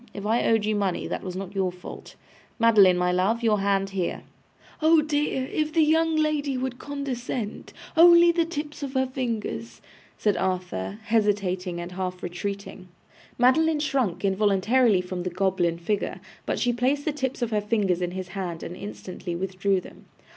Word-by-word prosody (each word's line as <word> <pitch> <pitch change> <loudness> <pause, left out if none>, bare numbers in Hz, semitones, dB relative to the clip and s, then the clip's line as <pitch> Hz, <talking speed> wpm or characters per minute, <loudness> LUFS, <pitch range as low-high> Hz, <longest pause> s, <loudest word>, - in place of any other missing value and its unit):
If 200 - -6
I 225 +3 +2
owed 225 -2 +3
you 215 0 +1
money, 195 -3 -1
that - - -3
was 185 -1 -6
not 195 0 -6
your 190 -2 0
fault. 180 0 -11 0.4
Madeline, 210 -6 +6
my 180 0 +2
love, 200 +6 +1
your 215 -2 +3
hand 195 0 +1
here.' 185 -3 -2 0.6
'Oh 315 0 +5
dear! 295 -3 0
If 305 +2 -2
the 325 -1 +4
young 320 +1 +3
lady 300 -3 0
would 255 -1 -3
condescent! 255 -6 -4 0.2
Only 340 +1 +8
the 340 0 +2
tips 300 -3 -5
of 275 -2 -4
her 260 0 +3
fingers,' 225 - -4 0.4
said 210 -2 +1
Arthur, 180 - -2
hesitating 200 -5 0
and 175 +1 -6
half 180 0 -4
retreating. 190 +1 -5 0.5
Madeline 305 +6 +4
shrunk 265 - 0
involuntarily 205 +2 +3
from 180 0 -5
the 180 - -2
goblin 180 -2 0
figure, 200 +4 -2 0.3
but - - 0
she 245 -1 +1
placed 265 +4 0
the 310 - 0
tips 265 -3 -2
of 235 - -2
her 210 -1 +1
fingers 205 -4 0
in 175 - 0
his 185 0 -6
hand 175 -3 -5
and 175 - -6
instantly 185 -3 -7
withdrew 190 +1 0
them. - - -14
205 Hz, 170 wpm, -25 LUFS, 185-265 Hz, 0.6 s, Only